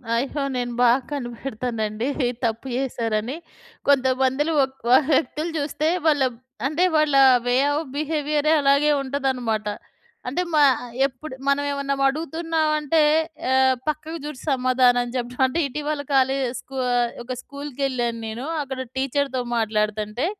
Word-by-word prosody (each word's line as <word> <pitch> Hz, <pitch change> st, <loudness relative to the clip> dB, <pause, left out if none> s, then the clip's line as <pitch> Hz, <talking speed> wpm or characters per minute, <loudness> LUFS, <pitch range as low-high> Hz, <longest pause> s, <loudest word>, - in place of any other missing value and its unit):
అయ్యో! 270 Hz, +4 st, -1 dB
నేను 245 Hz, -1 st, -2 dB
బాగా 245 Hz, +1 st, +5 dB
కనిపెడతానండి 235 Hz, -4 st, -3 dB, 0.4 s
తప్పు 230 Hz, +3 st, -2 dB
చేశారని. 235 Hz, -2 st, -2 dB, 0.5 s
కొంతమంది‌లో 265 Hz, +2 st, +2 dB
ఒక్ 265 Hz, 0 st, -4 dB
వ -, -, +3 dB, 0.2 s
వ్యక్తులు 305 Hz, +4 st, 0 dB
జూస్తే 300 Hz, +1 st, -1 dB, 0.2 s
వాళ్ళ 290 Hz, -3 st, +4 dB, 0.4 s
అంటే, 310 Hz, +5 st, 0 dB
వాళ్ళా 300 Hz, -3 st, +4 dB, 0.2 s
వే 245 Hz, 0 st, +2 dB, 0.2 s
ఆఫ్ 305 Hz, +1 st, -2 dB
బిహేవియరే 300 Hz, 0 st, 0 dB
అలాగే 280 Hz, +2 st, +4 dB
ఉంటుదనమాట. 260 Hz, -6 st, -1 dB, 0.6 s
అంటే, 275 Hz, +8 st, -1 dB
మా 305 Hz, -, +5 dB, 0.5 s
ఎప్పుడు 270 Hz, +2 st, -10 dB
మనవేవన్నా 280 Hz, 0 st, 0 dB
వడుగుతున్నావంటే 315 Hz, +1 st, +1 dB, 0.5 s
ఆహ్, 260 Hz, 0 st, +4 dB
పక్కకు 310 Hz, +2 st, -3 dB
జూసి 295 Hz, -4 st, -7 dB
సమాధానం 250 Hz, -2 st, +3 dB
చెప్పడం. 250 Hz, +1 st, -1 dB
అంటే, 260 Hz, +6 st, -2 dB
ఇటీవల 295 Hz, +2 st, -3 dB
కాలేజ్, 265 Hz, 0 st, +2 dB
స్కూ 270 Hz, +1 st, -10 dB, 0.2 s
ఆహ్, 240 Hz, -1 st, +1 dB
ఒక 255 Hz, +2 st, -5 dB
స్కూల్‌కేళ్ళాను 270 Hz, -5 st, -3 dB
నేను. 230 Hz, +5 st, -5 dB, 0.2 s
అక్కడ 265 Hz, -2 st, -5 dB, 0.2 s
టీచర్‌తో 270 Hz, 0 st, 0 dB, 0.2 s
మాట్లాడతంటే, 215 Hz, +2 st, -1 dB
270 Hz, 120 wpm, -23 LUFS, 245-295 Hz, 0.6 s, బాగా